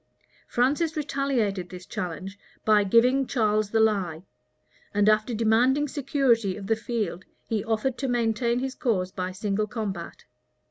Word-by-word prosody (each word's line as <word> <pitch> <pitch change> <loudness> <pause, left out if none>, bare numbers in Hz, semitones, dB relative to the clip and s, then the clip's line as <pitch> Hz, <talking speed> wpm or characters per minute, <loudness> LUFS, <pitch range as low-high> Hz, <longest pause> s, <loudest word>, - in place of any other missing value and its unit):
Francis 295 +6 +1
retaliated 250 - -1
this 180 -1 -9
challenge, 185 +4 -5 0.3
by 210 -1 +5
giving 250 +6 +3
Charles 215 -4 +1
the 225 - +1
lie; 190 -7 +1 0.7
and, 205 0 +3
after 215 +2 +3
demanding 240 +6 +3
security 260 -8 +1
of 200 - -7
the 225 - +2
field, 220 -5 -3 0.2
he 215 -3 -1
offered 230 +3 -1
to 270 - -1
maintain 235 -1 +1
his 265 +1 -2
cause 200 -11 -1
by 185 -1 -3
single 205 +2 -1
combat. 205 -6 -5
220 Hz, 140 wpm, -26 LUFS, 200-250 Hz, 0.7 s, by